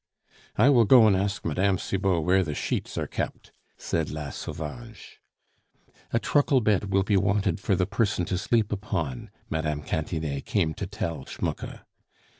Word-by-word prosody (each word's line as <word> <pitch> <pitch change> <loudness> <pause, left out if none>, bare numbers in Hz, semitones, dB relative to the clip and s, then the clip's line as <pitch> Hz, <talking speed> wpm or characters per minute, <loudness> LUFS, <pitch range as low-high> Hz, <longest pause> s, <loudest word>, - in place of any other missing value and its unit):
"I 115 +7 +5
will 120 -4 +5
go 120 +1 +7
and 105 -3 +5
ask 100 +2 -1
Mme. 95 +5 +1
Cibot 95 -3 0
where 95 +3 +3
the 75 -4 -4
sheets - - -3
are - - 0
kept," - - -5 0.3
said 80 -2 -2
La 75 -2 -5
Sauvage. 105 +7 -8 0.9
"A - - +2
truckle 145 +3 +3
bed 105 -3 +1
will 95 0 +3
be 100 +1 +2
wanted 100 +1 +1
for 95 0 +1
the 90 - +1
person 100 -3 0
to 90 - -1
sleep 110 +2 +1
upon," 95 - -3 0.2
Mme. 75 -2 -1
Cantinet 80 -3 -3
came 85 -7 +1
to - - -5
tell 80 -5 -4
Schmucke. - - -5
95 Hz, 160 wpm, -26 LUFS, 80-105 Hz, 0.9 s, go